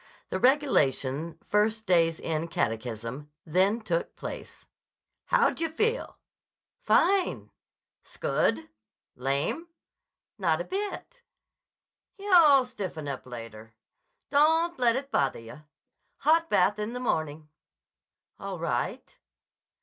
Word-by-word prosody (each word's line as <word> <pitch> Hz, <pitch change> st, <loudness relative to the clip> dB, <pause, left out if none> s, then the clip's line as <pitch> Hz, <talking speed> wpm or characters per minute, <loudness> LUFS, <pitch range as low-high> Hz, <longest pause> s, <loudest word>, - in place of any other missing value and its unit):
The -, -, -2 dB
regulation 165 Hz, -, +2 dB
first 220 Hz, +2 st, +1 dB
day's 165 Hz, -4 st, +3 dB
end 165 Hz, +1 st, -2 dB
catechism 115 Hz, +2 st, -3 dB, 0.2 s
then 190 Hz, +7 st, +2 dB
took 170 Hz, -6 st, -2 dB
place. -, -, -8 dB, 0.6 s
"How -, -, +3 dB
d'yah 330 Hz, 0 st, -2 dB
feel?" 445 Hz, +10 st, -1 dB, 0.6 s
"Fine!" 350 Hz, -, +2 dB, 0.5 s
"'s -, -, -16 dB
good! 110 Hz, 0 st, 0 dB, 0.5 s
Lame?" 140 Hz, -, -1 dB, 0.7 s
"Not 165 Hz, -5 st, +1 dB
a -, -, -2 dB
bit." 415 Hz, -, -5 dB, 1.0 s
"Yah'll 335 Hz, -10 st, +6 dB
stiffen 190 Hz, -11 st, -6 dB
up 135 Hz, -2 st, -5 dB
later. 115 Hz, -2 st, -10 dB, 0.6 s
Don't 320 Hz, +3 st, +3 dB
let 235 Hz, -2 st, +3 dB
it 275 Hz, +1 st, -4 dB
bother 140 Hz, -1 st, +1 dB
yah. 115 Hz, +5 st, -11 dB, 0.6 s
Hot 330 Hz, +2 st, +3 dB
bath 205 Hz, +2 st, +3 dB
in 210 Hz, +3 st, -3 dB
the 250 Hz, -, -4 dB
morning." 155 Hz, -9 st, -2 dB, 0.9 s
"All -, -, -5 dB
right." -, -, -3 dB
185 Hz, 105 wpm, -28 LUFS, -, 1.0 s, Yah'll